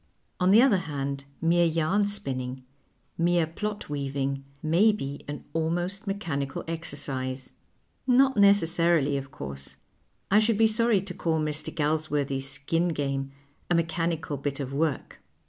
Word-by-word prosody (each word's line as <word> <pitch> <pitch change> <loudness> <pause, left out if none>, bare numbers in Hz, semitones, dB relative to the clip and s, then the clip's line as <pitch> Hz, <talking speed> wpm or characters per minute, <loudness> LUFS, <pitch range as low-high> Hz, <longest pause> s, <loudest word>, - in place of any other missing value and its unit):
On 180 0 +3
the 220 +5 +7
other 225 -8 +4
hand, 140 -4 -4 0.2
mere 170 +1 +4
yarn 165 +6 +1
spinning, 130 -9 -2 0.6
mere 170 0 +3
plot 210 +6 -5
weaving, 140 -1 -2 0.2
may 175 +8 +4
be 140 -9 -5
an 145 0 -6
almost 175 +6 -2
mechanical 155 -9 -3
exercise. 135 -5 -2 0.5
Not 265 +1 +5
necessarily, 170 -7 +4
of 135 -1 -4
course. 70 - -8 0.5
I 205 - +6
should 220 0 +2
be 225 - +5
sorry 220 -2 +3
to 195 -2 -6
call 165 -2 0
Mr. 150 0 -1
Galsworthy's 145 -3 -1
Skin 145 +6 -1
Game 140 -4 -2 0.4
a 175 - +3
mechanical 165 -3 -1
bit 140 +1 -3
of 135 -1 -4
work. 150 -1 -2
160 Hz, 135 wpm, -27 LUFS, 140-185 Hz, 0.6 s, the